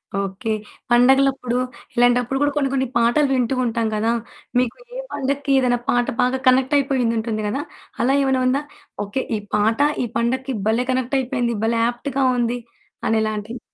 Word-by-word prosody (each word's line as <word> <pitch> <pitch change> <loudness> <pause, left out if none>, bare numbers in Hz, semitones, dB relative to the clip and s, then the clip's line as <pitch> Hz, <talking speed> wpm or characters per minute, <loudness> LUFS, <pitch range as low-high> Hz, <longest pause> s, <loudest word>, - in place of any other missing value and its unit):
Okay. 195 +2 -2 0.4
పండుగలప్పుడు, 260 0 +4 0.4
ఇలాంటప్పుడు 245 +1 +3
కూడా 290 0 +3
కొన్ని 275 -2 +1
కొన్ని 265 -1 +1
పాటలు 240 +5 +3
వింటూ 255 0 +1
ఉంటాం 230 -1 0
గదా! 220 +2 +1 0.5
మీకు 250 -1 -1 0.2
ఏ - - -3
పడక్కి 280 +1 -2
ఏదైనా 245 -2 +2
పాట 245 0 +3 0.2
బాగా 255 +1 +2
కనెక్ట్ 260 +2 +4
అయిపోయుంటుంది 230 -5 0
గదా! 270 +8 -2 0.4
అలా 255 +3 +3
ఏమైనా 265 -1 +1
ఉందా? 270 +3 +2 0.4
ఓకే. 205 +7 -2
ఈ - - -4 0.2
పాట, 215 +2 +2 0.2
ఈ - - 0
పండగకి 260 +3 -1
భలే! 230 +3 +2
కనెక్ట్ 255 +1 0
అయిపోయింది. 245 -2 -1
భలే! 230 0 +1
యాప్ట్‌గా 265 +3 -2 0.2
ఉంది 240 +1 0 0.5
అనేలాంటియి. 220 +1 -1
245 Hz, 150 wpm, -21 LUFS, 230-265 Hz, 0.5 s, పండుగలప్పుడు